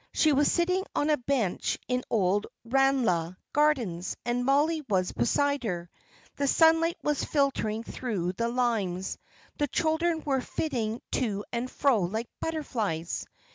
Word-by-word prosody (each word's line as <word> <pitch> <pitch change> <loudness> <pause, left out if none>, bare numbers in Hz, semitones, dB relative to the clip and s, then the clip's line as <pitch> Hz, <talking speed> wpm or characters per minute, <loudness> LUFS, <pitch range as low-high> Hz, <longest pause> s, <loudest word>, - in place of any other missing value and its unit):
She 310 - +4
was 285 +1 +3
sitting 365 +2 +1
on 300 +1 +2
a 300 - +3
bench 245 -7 0
in 250 0 0
Old 205 -1 +1 0.2
Ranelagh 230 -10 +2 0.2
gardens, 240 - +1
and 240 +1 0
Mollie 300 +4 +2
was 185 -3 +1
beside 285 - +1
her. 175 -5 -3 0.5
The 280 - +1
sunlight 325 +3 +4
was 295 -1 0
filtering 245 -7 0
through 205 -9 -3
the 230 +5 -1
limes, 220 -7 -1 0.4
the 290 - +2
children 320 +2 0
were 270 -3 +1
flitting 240 -7 -2
to 205 -5 -1
and 240 +2 -2
fro 270 -5 +2
like 220 +7 -2
butterflies. 220 - -2
250 Hz, 135 wpm, -28 LUFS, 205-295 Hz, 0.5 s, She